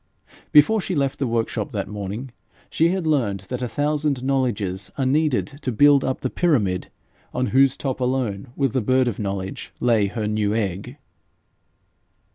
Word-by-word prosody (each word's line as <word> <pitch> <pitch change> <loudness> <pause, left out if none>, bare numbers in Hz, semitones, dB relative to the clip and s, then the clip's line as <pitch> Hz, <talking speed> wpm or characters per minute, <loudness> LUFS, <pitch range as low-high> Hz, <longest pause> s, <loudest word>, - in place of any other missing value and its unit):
Before 175 +9 +6
she 185 - -3
left 140 -1 0
the 135 - 0
workshop 115 -1 -1
that - - -2
morning, 105 +5 -5 0.4
she 165 +1 +3
had 185 -1 -1
learned 120 -11 +1
that 125 0 -3
a 125 - -1
thousand 145 +1 -1
knowledges 105 -9 -1
are 135 - 0
needed 145 0 0
to 130 - -2
build 140 +4 +5
up 130 - -2
the 130 - -1
pyramid 105 - +1 0.5
on 130 - +1
whose 135 0 +4
top 135 -2 -3
alone 125 -4 -1
will 135 -1 +1
the 130 +2 -1
bird 130 +3 +2
of 115 - -2
knowledge 100 +5 -4
lay 115 -4 +3
her 110 +2 -3
new 105 0 0
egg. 105 +5 -3
125 Hz, 165 wpm, -23 LUFS, 105-140 Hz, 0.5 s, Before